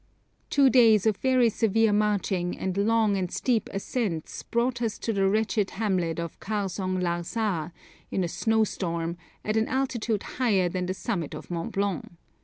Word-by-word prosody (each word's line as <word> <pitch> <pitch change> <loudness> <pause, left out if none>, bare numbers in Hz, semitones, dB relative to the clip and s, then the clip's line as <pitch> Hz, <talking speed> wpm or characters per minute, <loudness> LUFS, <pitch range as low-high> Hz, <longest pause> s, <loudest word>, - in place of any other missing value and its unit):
Two 280 -2 +5
days 225 -5 +6
of 215 -3 +2
very 255 -2 +3
severe 225 -1 +2
marching 200 -4 0
and 190 -1 -2
long 215 0 +2
and 185 -2 -2
steep 235 -5 0
ascents 195 -5 -3
brought 235 +1 -1
us 225 -2 -1
to 225 - -2
the 195 -1 +2
wretched 215 -1 +1
hamlet 185 -7 0
of 170 -1 -5
Kharzong 190 -3 -2
Lar 175 -1 -1
sa, 180 -5 -2 0.4
in 190 - 0
a - - 0
snowstorm, 170 -5 0 0.3
at 215 +1 0
an 220 - +2
altitude 240 -5 -1
higher 210 -8 +1
than 180 +1 -2
the 185 - -2
summit 185 -6 -3
of - - -9
Mont 170 -1 -3
Blanc. 195 -4 -2
205 Hz, 165 wpm, -27 LUFS, 180-225 Hz, 0.4 s, days